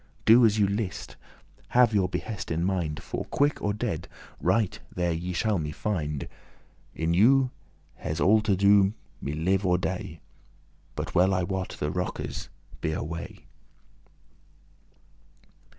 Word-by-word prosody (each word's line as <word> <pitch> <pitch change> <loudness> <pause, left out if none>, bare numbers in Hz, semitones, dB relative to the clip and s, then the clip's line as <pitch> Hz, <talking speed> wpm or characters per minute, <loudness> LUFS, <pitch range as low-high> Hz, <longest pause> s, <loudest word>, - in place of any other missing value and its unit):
Do 115 +1 +8
as 105 0 0
you 105 - +4
list, 100 -1 -3 0.6
have 120 -3 +6
your 95 -3 +2
behest 105 +1 -4
in 80 +1 -1
mind, 90 -5 -1
For, - - -4
quick 145 +1 +1
or 105 - 0
dead, 100 -6 -3 0.3
right 110 -5 +1 0.2
there 90 -1 0
ye 85 +2 -3
shall 100 +2 +1
me 75 -1 -3
find; 75 -6 -3 0.7
In 80 +1 0
you 130 +7 +5 0.5
hes 80 +2 -4
all 110 +5 +5
to 105 -2 +2
*do 100 +1 +4 0.3
me 70 - -3
live 95 +6 +1
or 90 -2 +3
dey;* 95 +1 -1
*cause - - -6
me 80 - -10
to 80 - -22 0.7
But - - -4
well 95 +2 +4
I 90 - +1
wot 95 0 -3
the - - -1
rockes - - -4 0.3
be 80 - -1
away." 80 +2 -6
95 Hz, 150 wpm, -27 LUFS, 85-105 Hz, 0.7 s, Do